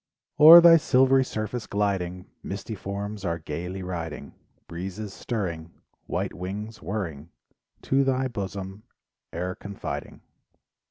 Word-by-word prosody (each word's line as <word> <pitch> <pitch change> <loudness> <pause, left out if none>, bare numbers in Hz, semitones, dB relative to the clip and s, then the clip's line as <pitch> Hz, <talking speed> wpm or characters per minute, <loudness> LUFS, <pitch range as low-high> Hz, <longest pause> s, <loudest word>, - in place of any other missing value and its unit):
O'er 160 +3 +11
thy 170 -1 +8
silvery 135 -3 +4
surface 110 -1 -4
gliding 95 -3 -2 0.2
Misty 100 +3 -6
forms 100 +1 -5
are 85 -3 -1
gaily 85 +4 -6
riding, 85 -4 -6 0.3
Breezes 95 +4 -6
stirring, 85 -10 -4 0.4
White - - -2
wings, 105 +5 -6
whirring 85 -7 -5 0.5
To 135 +1 +2
thy 130 0 +1
bosom 100 -3 -6 0.5
e'er 90 +2 -3
confiding. 100 +1 -7
100 Hz, 110 wpm, -26 LUFS, 90-110 Hz, 0.5 s, O'er